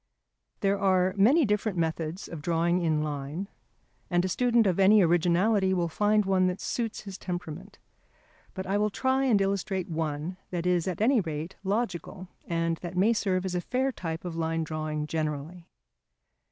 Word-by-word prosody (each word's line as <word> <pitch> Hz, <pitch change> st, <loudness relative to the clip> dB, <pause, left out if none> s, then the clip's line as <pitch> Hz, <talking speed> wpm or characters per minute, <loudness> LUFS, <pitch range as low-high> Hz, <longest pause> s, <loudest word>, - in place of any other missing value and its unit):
There 200 Hz, -1 st, +1 dB
are 185 Hz, -1 st, +3 dB
many 260 Hz, +11 st, +5 dB
different 210 Hz, -2 st, 0 dB
methods 165 Hz, +1 st, -2 dB
of 165 Hz, -3 st, -7 dB
drawing 170 Hz, +2 st, +1 dB
in 155 Hz, -2 st, +1 dB
line, 150 Hz, +5 st, -4 dB, 0.6 s
and 175 Hz, 0 st, +2 dB
a -, -, -1 dB
student 240 Hz, +3 st, +3 dB
of 190 Hz, -1 st, +1 dB
any 200 Hz, +1 st, +6 dB
originality 180 Hz, +4 st, +3 dB
will 175 Hz, -2 st, +1 dB
find 210 Hz, +4 st, +2 dB
one 190 Hz, -1 st, +3 dB
that 180 Hz, +1 st, -2 dB
suits 230 Hz, -2 st, -3 dB
his 195 Hz, -2 st, -9 dB
temperament. 180 Hz, +1 st, -6 dB, 0.8 s
But 190 Hz, -1 st, -4 dB
I 195 Hz, +2 st, 0 dB
will 210 Hz, 0 st, +2 dB
try 265 Hz, +5 st, +1 dB
and 230 Hz, -6 st, +4 dB
illustrate 195 Hz, -1 st, -1 dB
one 160 Hz, +2 st, -3 dB
that 175 Hz, -1 st, -3 dB
is 180 Hz, -1 st, +1 dB
at 185 Hz, +1 st, -3 dB
any 240 Hz, +1 st, +4 dB
rate 160 Hz, +1 st, -5 dB
logical, 195 Hz, -3 st, -3 dB, 0.2 s
and 165 Hz, -1 st, 0 dB
that 175 Hz, +1 st, -7 dB
may 210 Hz, +5 st, +4 dB
serve 190 Hz, -4 st, 0 dB
as 185 Hz, -, -2 dB
a 180 Hz, -, 0 dB
fair 260 Hz, +6 st, 0 dB
type 165 Hz, -7 st, -5 dB
of 175 Hz, -2 st, -4 dB
line 165 Hz, 0 st, -1 dB
drawing 155 Hz, -1 st, -3 dB
generally. 155 Hz, +2 st, -4 dB
180 Hz, 170 wpm, -28 LUFS, 165-200 Hz, 0.8 s, any